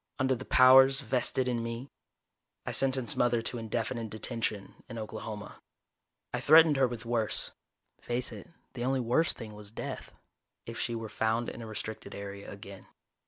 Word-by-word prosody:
"Under 130 0 +2
the 130 +1 -5
powers 135 +2 +7
vested 130 +1 0
in 120 -2 0
me 115 +3 -5 0.4
..." - - -55
I - - -2
sentenced 130 -3 +2
Mother 120 -2 +2
to 120 - -2
indefinite 115 +1 -3
detention 110 -2 -3
in 115 - -7
Oklahoma. 110 -1 -7 0.7
I - - 0
threatened 160 0 +7
her 135 -1 +4
with 120 -3 -7
worse 115 -2 -1 0.5
face 120 +1 -1
it, - - -10 0.2
the 120 -2 -4
only 130 +1 +1
worse 125 +6 +2
thing 110 -2 -9
was 105 -1 -10
death 110 - -7 0.5
if - - -7
she 120 - -1
were 115 -1 -4
found 110 +2 0
in - - -8
a 115 - -7
restricted 110 0 -6
area 100 0 -7
again. 100 -1 -11
115 Hz, 165 wpm, -30 LUFS, 110-130 Hz, 0.7 s, powers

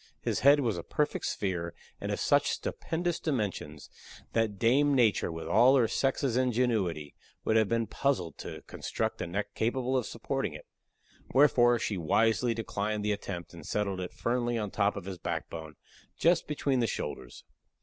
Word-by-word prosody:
His - - -1
head 145 +2 +6
was 110 -9 0
a - - -6
perfect 150 0 -1
sphere, 85 -4 -2 0.2
and - - -3
of - - -2
such - - +3
stupendous 170 +1 -2
dimensions 100 - -3 0.5
that 110 -3 +1
Dame 140 +7 +3
Nature, 115 -8 +3
with 80 0 -6
all 125 +6 +6
her 120 -4 +4
sex's 135 0 0
ingenuity, 115 - 0 0.3
would 110 - +2
have 110 -3 +4
been 115 0 +1
puzzled 95 - -1
to - - -7
construct - - -3
a - - -2
neck 100 +4 -3
capable 125 +3 0
of 125 -4 0
supporting - - -3
it; - - -10 0.7
wherefore 120 -4 +5
she 105 -3 -2
wisely 115 +8 +2
declined 105 -1 -2
the 105 - +2
attempt, 95 -4 -5
and 85 -2 -10
settled 100 -3 -1
it 90 -1 -4
firmly 120 0 -1
on 105 -2 -2
the - - -17
top 100 -1 +2
of 100 -3 -6
his 95 -2 -6
backbone, 80 -2 -5 0.4
just 170 +1 +3
between 140 -3 0
the 115 - +2
shoulders. - - -5
110 Hz, 170 wpm, -30 LUFS, 95-130 Hz, 0.7 s, head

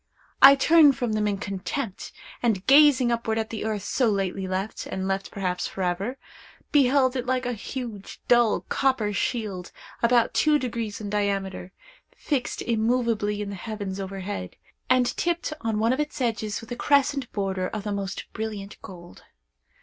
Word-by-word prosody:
I 275 +1 +10
turned 290 -1 +5
from 235 -3 -1
them 210 -1 +1
in 200 -1 0
contempt, 195 +3 -4 0.3
and, 215 -6 0
gazing 275 -3 +6
upward 230 -1 -1
at 220 0 -2
the 220 - -4
earth 215 -3 -2
so 245 +2 +1
lately 195 -2 -1
left, 190 +3 -3
and 190 0 -3
left 195 0 -2
perhaps 180 -3 -2
for 190 - -5
ever, 195 +9 -2 0.5
beheld 265 -2 +4
it 250 -1 -3
like 255 0 0
a 245 - -1
huge, 225 -2 -7
dull, 240 -3 +4
copper 260 -6 0
shield, 200 -5 -2 0.3
about 235 0 +3
two 305 -1 +4
degrees 230 -5 -4
in 205 -1 -5
diameter, 195 -3 -2 0.5
fixed 270 -5 -2
immovably 225 -2 0
in 200 - -6
the - - -5
heavens 200 -1 -5
overhead, 190 - -5 0.3
and 255 0 +4
tipped 345 -2 -1
on 225 -1 -1
one 225 +3 +2
of 260 - -3
its 300 -1 -3
edges 220 -4 -1
with 225 - -13
a - - -2
crescent 275 0 +1
border 190 -2 -2
of 215 0 -5
the 210 - -3
most 195 -2 -4
brilliant 210 -2 -6
gold. 175 -2 -12
220 Hz, 165 wpm, -25 LUFS, 195-250 Hz, 0.5 s, I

